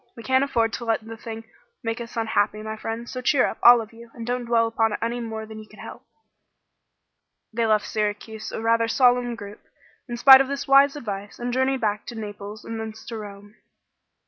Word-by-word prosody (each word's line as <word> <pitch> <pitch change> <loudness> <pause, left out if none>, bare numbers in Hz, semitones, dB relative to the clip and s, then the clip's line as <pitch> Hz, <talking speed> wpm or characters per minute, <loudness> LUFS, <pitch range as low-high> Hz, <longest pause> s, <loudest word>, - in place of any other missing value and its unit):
We 230 - -10
can't 260 +4 +3
afford 230 -5 0
to 240 - -5
let 225 -1 0
the 225 0 -8
thing 225 0 -8 0.4
make 230 +1 -3
us 235 0 -9
unhappy, 215 -1 0
my 220 0 -5
friends; 225 +2 -6
so 255 - -5
cheer 255 +1 +3
up, - - -4
all 240 0 +8
of 220 0 -11
you, 235 +1 -14
and 230 -2 -7
don't 245 0 -2
dwell 230 -1 +3
upon 225 -1 0
it - - -3
any 235 +1 -2
more 220 -2 -5
than 220 0 -10
you 215 - -12
can - - -17
help." - - -9 1.5
They 230 0 0
left 215 -1 +2
Syracuse 215 0 -3
a - - -5
rather 230 0 +2
solemn 245 0 +3
group, 205 -2 -10 0.5
in 240 - -4
spite 265 +2 +9
of 270 - -1
this 280 0 -4
wise 275 +1 +6
advice, 205 -7 -6
and 245 0 -4
journeyed 260 +1 +1
back 210 -1 -1
to 240 - -7
Naples 210 0 -8
and 225 0 -5
thence 220 0 -7
to 230 - -5
Rome. 205 0 -11
225 Hz, 215 wpm, -24 LUFS, 220-240 Hz, 1.5 s, spite